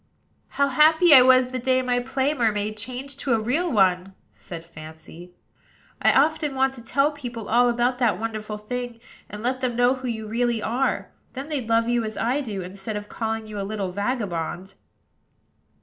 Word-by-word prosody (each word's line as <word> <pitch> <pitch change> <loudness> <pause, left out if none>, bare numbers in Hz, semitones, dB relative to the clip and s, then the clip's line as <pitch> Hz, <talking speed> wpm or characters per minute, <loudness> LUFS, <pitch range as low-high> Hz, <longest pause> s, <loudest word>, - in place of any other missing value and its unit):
"How 280 0 +3
happy 315 +4 +5
I 260 - +10
was 255 0 +5
the 255 0 -4
day 255 +1 +1
my 245 -1 +1
play 265 +3 -1
mermaid 215 -5 0
changed 255 +5 -5
to 265 - 0
a - - 0
real 290 +11 0
one!" 190 -3 +2 0.2
said 165 -2 -9
Fancy. 160 +2 -12 0.7
"I - - +5
often 300 0 +2
want 265 0 +2
to 250 - -11
tell 275 +5 +1
people 245 -7 -7
all 245 +2 +4
about 245 +1 0
that 230 -7 +2
wonderful 215 -1 -4
thing, 240 +2 -5 0.3
and 210 +1 -8
let 255 +1 -1
them 250 -2 -1
know 245 +1 +4
who 260 -1 -6
you 220 -2 -4
really 235 +1 0
are: 245 +5 -1 0.2
then 275 +3 -7
they'd 265 -7 -3
love 230 0 +3
you 240 -1 +1
as 220 0 -5
I 255 +5 0
do, 205 -8 -5
instead 190 +4 -7
of 205 0 -8
calling 225 -1 -3
you 215 -1 -7
a - - -2
little 195 -2 -3
vagabond." 190 -4 -3
235 Hz, 185 wpm, -24 LUFS, 210-260 Hz, 0.7 s, I